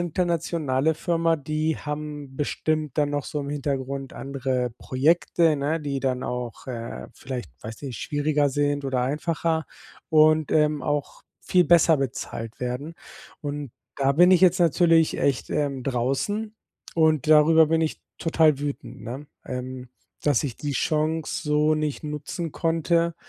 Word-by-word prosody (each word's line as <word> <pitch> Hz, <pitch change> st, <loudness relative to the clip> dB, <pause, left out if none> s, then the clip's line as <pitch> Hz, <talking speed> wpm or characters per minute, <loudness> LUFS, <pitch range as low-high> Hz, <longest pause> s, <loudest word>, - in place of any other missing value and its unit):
internationale 165 Hz, -4 st, 0 dB
Firma, 165 Hz, 0 st, +1 dB
die 155 Hz, +2 st, -1 dB
haben 150 Hz, -2 st, -6 dB
bestimmt 155 Hz, 0 st, -1 dB
dann 145 Hz, -1 st, +2 dB
noch 145 Hz, -2 st, -2 dB
so 150 Hz, -, -3 dB
im 140 Hz, -, -5 dB
Hintergrund 140 Hz, -2 st, -3 dB
andere 130 Hz, -2 st, -2 dB
Projekte, 160 Hz, +3 st, +2 dB
ne, 150 Hz, +4 st, -1 dB
die 140 Hz, -2 st, -3 dB
dann 130 Hz, -1 st, -1 dB
auch, 125 Hz, -3 st, -5 dB
äh, 115 Hz, -, -6 dB
vielleicht, 125 Hz, -, -6 dB
weiß 110 Hz, +3 st, -8 dB
nicht, 130 Hz, -7 st, -5 dB
schwieriger 145 Hz, 0 st, +1 dB
sind 145 Hz, +1 st, 0 dB
oder 130 Hz, -2 st, 0 dB
einfacher 160 Hz, +4 st, -1 dB, 0.4 s
und, 155 Hz, -1 st, +5 dB
ähm, 150 Hz, -1 st, +2 dB
auch 145 Hz, -2 st, -2 dB, 0.2 s
viel 180 Hz, -1 st, +3 dB
besser 170 Hz, -2 st, +5 dB
bezahlt 120 Hz, -4 st, -4 dB
werden. 125 Hz, +6 st, -4 dB, 0.5 s
Und 145 Hz, -2 st, -5 dB, 0.3 s
da 140 Hz, 0 st, +2 dB
bin 175 Hz, +5 st, +6 dB
ich 185 Hz, -, +5 dB
jetzt 185 Hz, 0 st, +5 dB
natürlich 165 Hz, -1 st, +4 dB
echt, 140 Hz, -3 st, 0 dB
ähm, 140 Hz, -3 st, -1 dB
draußen 140 Hz, -, -1 dB, 0.4 s
und 155 Hz, -3 st, +2 dB
darüber 155 Hz, +1 st, +6 dB
bin 160 Hz, +1 st, +2 dB
ich 160 Hz, -, -2 dB, 0.2 s
total 160 Hz, -3 st, +3 dB
wütend, 145 Hz, -1 st, -5 dB
ne, 130 Hz, +6 st, -7 dB, 0.2 s
ähm, 125 Hz, 0 st, -6 dB, 0.3 s
dass 145 Hz, -5 st, +2 dB
ich 130 Hz, -5 st, -4 dB
die 145 Hz, -1 st, -3 dB
Chance 155 Hz, +3 st, -1 dB
so 150 Hz, +1 st, +3 dB
nicht 155 Hz, -2 st, -2 dB
nutzen 150 Hz, +3 st, -4 dB
konnte. 165 Hz, +1 st, +1 dB
150 Hz, 145 wpm, -25 LUFS, 135-160 Hz, 0.5 s, bin